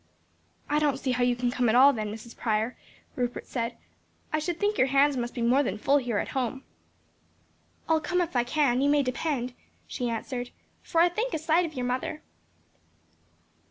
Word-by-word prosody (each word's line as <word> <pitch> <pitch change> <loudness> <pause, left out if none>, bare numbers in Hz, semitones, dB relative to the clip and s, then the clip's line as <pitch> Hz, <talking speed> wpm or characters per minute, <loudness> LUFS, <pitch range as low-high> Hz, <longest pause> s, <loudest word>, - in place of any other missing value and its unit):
"I 295 +1 +2
don't 290 -3 +1
see 270 -1 -2
how 250 0 +1
you 245 0 +2
can 245 0 -1
come 245 -2 +1
at 220 - +3
all 275 +3 +7
then, 215 -3 -3
Mrs. 225 +2 -9
Prior," 220 +1 -1 0.4
Rupert 245 -1 -3
said, 235 -1 -3 0.6
"I 310 - +2
should 335 +2 -3
think 415 +1 +1
your 260 - +5
hands 275 +1 +4
must 240 0 -3
be 240 - -2
more 250 +4 +4
than 215 -7 -2
full 275 +6 +3
here 245 -6 -1
at - - -2
home." 265 0 -2 1.2
"I'll 320 -1 +3
come 360 +4 0
if 345 -5 -1
I 245 - +3
can, 260 -1 +1
you 285 - +3
may 290 0 +4
depend," 255 -1 -2 0.3
she 245 -2 -3
answered, 245 +2 -4 0.3
"for 330 - +1
I 350 - +5
think 450 +8 -2
a - - +1
sight 320 +3 +2
of 310 - -11
your 250 -1 -2
mother." 255 +5 -3
260 Hz, 195 wpm, -27 LUFS, 245-300 Hz, 1.2 s, all